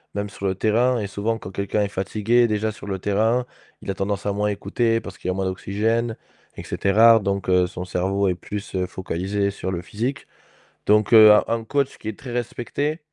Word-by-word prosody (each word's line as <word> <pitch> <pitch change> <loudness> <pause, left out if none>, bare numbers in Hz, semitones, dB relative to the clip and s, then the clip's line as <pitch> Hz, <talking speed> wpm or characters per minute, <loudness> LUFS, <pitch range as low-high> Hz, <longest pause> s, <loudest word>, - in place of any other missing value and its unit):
même 100 0 -2
sur 100 0 -4
le 95 - 0
terrain 120 +4 +2
et 105 - -2
souvent 110 +3 -2
quand 95 - -9
quelqu'un 100 +2 -1
est 100 - 0
fatigué, 110 +5 +1
déjà 110 0 -1
sur 105 - -11
le 95 -1 -2
terrain, 110 +6 +1 0.4
il 95 - -3
a - - -2
tendance 100 +1 -3
à 100 - 0
moins 105 +1 0
écouter, 115 +3 0
parce 100 -3 -10
qu'il - - -7
y - - +2
a - - -1
moins 95 0 -1
d'oxygène 110 +5 -1 0.4
et - - -6
cetera. 115 +3 +5
Donc 100 -2 -2
heu, 90 -1 +4
son 90 +1 -7
cerveau 95 +2 0
est - - +1
plus, 105 +3 -7
heu, 90 -1 -1
focalisé 95 +2 -2
sur 95 - -5
le 90 -1 -4
physique. 120 +9 -4 0.6
Donc 105 +2 +3
heu, 110 -1 +10
un 105 - +4
un 115 0 -1
coach 140 +4 -1
qui 110 - -6
est 105 - -8
très 130 - -8
respecté, 130 +5 -3
105 Hz, 220 wpm, -23 LUFS, 95-115 Hz, 0.6 s, heu